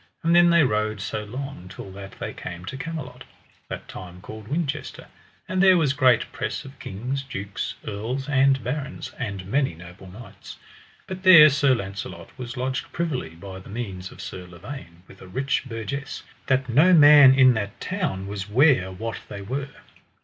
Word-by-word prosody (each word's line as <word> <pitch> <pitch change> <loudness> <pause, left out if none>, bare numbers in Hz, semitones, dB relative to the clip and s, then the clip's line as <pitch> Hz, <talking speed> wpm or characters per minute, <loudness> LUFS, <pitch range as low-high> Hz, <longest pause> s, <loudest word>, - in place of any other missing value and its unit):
And 165 +1 +3
then 175 0 +7
they 170 -2 +5
rode 110 -3 0
so 105 +2 -4
long 130 -3 -7
till 95 0 -9
that 95 0 -10
they - - -5
came 85 +1 -8
to 135 - -6
Camelot, 135 -4 -6 0.5
that - - -6
time 90 -1 -10
called 110 +3 -10
Winchester; 155 +2 -3 0.4
and 185 0 0
there 190 -1 +7
was 150 -5 +2
great 130 -4 +3
press - - -4
of 135 +1 -13
kings, 125 +8 -4
dukes 100 -7 -5
earls, 120 +7 -4
and 135 -1 +3
barons, 140 +3 -4
and 100 -7 -4
many 130 - 0
noble 90 +3 -12
knights. 100 0 -12 0.5
But 185 0 -7
there 170 -5 +9
Sir 140 -2 +3
Launcelot 95 -4 -7
was 125 -2 -7
lodged 130 +1 -3
privily 135 - -3
by 95 +2 -9
the 95 - -14
means 95 -4 -6
of - - -11
Sir 90 -1 -7
Lavaine 90 -1 -10
with - - -16
a - - -11
rich 135 +9 -1
burgess, 130 +4 -5 0.2
that 130 -1 +1
no 155 +10 +5
man 145 -3 +9
in 130 -2 +6
that 105 -3 -4
town 175 - -3
was 100 0 -5
ware 125 - +4
what 115 +5 -5
they 100 - -7
were. 135 +6 -4
125 Hz, 175 wpm, -24 LUFS, 100-140 Hz, 0.5 s, there